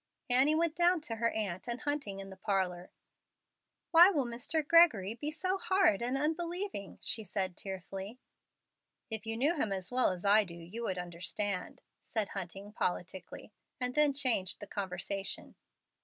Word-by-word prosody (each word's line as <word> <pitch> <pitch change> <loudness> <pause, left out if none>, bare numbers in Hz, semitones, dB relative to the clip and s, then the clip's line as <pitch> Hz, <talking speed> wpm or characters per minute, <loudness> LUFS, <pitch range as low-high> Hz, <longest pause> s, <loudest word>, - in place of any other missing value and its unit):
Annie 270 +5 +5
went 330 0 +1
down 350 0 +4
to 225 -6 -4
her 230 +1 +2
aunt 190 -5 -3
and 240 +1 -3
Hunting 285 -10 -2
in 195 0 -8
the - - -9
parlor. 190 -3 -1 1.0
"Why 345 +2 +9
will 295 -9 0
Mr. 245 +6 -2
Gregory 300 - +5
be 290 +6 -4
so 370 +5 -1
hard 375 - +3
and 250 +3 -1
unbelieving?" 335 - -3
she 220 - 0
said, 190 -2 -2
tearfully. 195 +4 -7 0.9
"If 220 0 -5
you 225 0 -2
knew 285 +7 +3
him 225 -9 0
as 190 0 -2
well 255 0 +5
as 185 +1 -5
I 210 +2 +6
do 175 -4 -9
you 175 +7 -8
would 185 - -2
understand," 180 +2 -3 0.2
said 220 -4 -2
Hunting, 195 +2 -6
politicly, 185 +1 -4 0.3
and 250 0 0
then 300 0 +4
changed 230 -10 +2
the 205 - -7
conversation. 195 0 -4
220 Hz, 160 wpm, -32 LUFS, 190-295 Hz, 1.0 s, Why